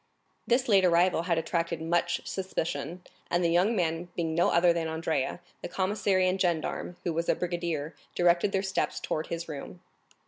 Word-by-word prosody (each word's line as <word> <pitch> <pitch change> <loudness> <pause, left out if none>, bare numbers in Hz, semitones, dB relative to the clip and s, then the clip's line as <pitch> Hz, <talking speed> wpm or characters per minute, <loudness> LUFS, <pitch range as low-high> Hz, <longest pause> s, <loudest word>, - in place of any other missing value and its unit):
This 250 +1 +2
late 200 -4 +5
arrival 175 0 +4
had 170 - +3
attracted 170 0 -1
much 165 +2 0
suspicion, 180 -1 -3 0.3
and 175 +1 +1
the 170 - +2
young 185 +7 +3
man 170 -2 -1
being 165 -2 -1
no 170 +2 +3
other 170 0 +4
than 165 -1 -1
Andrea, 160 -1 -2 0.2
the - - -4
commissary 190 0 +1
and 185 +1 0
gendarme, 175 0 -1
who 170 - -1
was 165 +1 -1
a - - +4
brigadier, 170 -3 -3 0.2
directed 175 +2 +3
their 195 0 0
steps 190 -3 -1
towards 155 - -3
his 170 0 -4
room. 155 +3 -8
175 Hz, 175 wpm, -29 LUFS, 165-185 Hz, 0.3 s, late